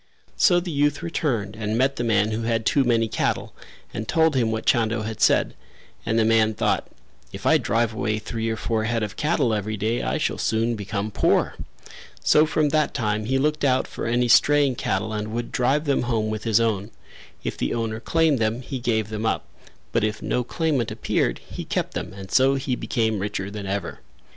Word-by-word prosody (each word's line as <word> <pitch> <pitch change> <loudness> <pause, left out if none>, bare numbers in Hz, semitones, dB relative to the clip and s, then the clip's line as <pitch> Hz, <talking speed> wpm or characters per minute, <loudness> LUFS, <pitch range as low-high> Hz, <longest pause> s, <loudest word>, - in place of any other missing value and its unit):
So 175 -2 +4
the 175 0 -5
youth 145 +2 +1
returned 120 -12 -2
and 110 0 -2
met 135 +2 +1
the 120 - -1
man 110 -2 +2
who 110 +1 -2
had 115 -1 -1
too 140 - +3
many 115 -2 +2
cattle - - -2 0.4
and 110 0 -4
told 160 0 +3
him 120 -3 +2
what 110 0 -3
Chando 115 -1 +2
had 110 0 -5
said, - - +3 0.5
and 110 - +1
the 115 - +3
man 110 -1 +3
thought - - 0 0.4
"If - - -9
I - - +5
drive 115 +1 0
away 110 0 -1
three 115 +1 -3
or 110 - -2
four 110 -1 -1
head 115 0 0
of 105 -1 -4
cattle 150 -5 +1
every 110 0 -2
day 110 +4 -1
I - - -1
shall - - -1
soon 115 +2 +1
become 105 0 -4
poor" - - +2 0.7
so 155 +1 +5
from 155 -1 +1
that 155 +1 +1
time 105 -4 -1
he 135 +4 +1
looked 150 +2 0
out 130 -2 +3
for - - -5
any 120 +1 +2
straying 145 +2 +5
cattle 110 -2 -2
and 105 0 -3
would 120 0 -3
drive 135 +5 +1
them 140 -2 +1
home 110 -3 -1
with 110 +1 -5
his 110 -1 +3
own; 110 -3 0 0.5
if - - -3
the - - -2
owner 110 -1 -2
claimed 160 +1 +2
them, 115 +3 -1
he 130 0 -5
gave 110 -3 0
them 110 +1 -2
up, - - -1 0.5
but 115 - +1
if 110 0 -1
no 125 - -1
claimant 145 -3 -1
appeared, - - -1
he - - -6
kept - - -2
them - - -4
and 95 0 -10
so 135 +1 +4
he 135 -1 -1
became 110 -3 -1
richer 100 0 -3
than 100 -1 -6
ever. 100 0 -3
115 Hz, 205 wpm, -24 LUFS, 110-130 Hz, 0.7 s, I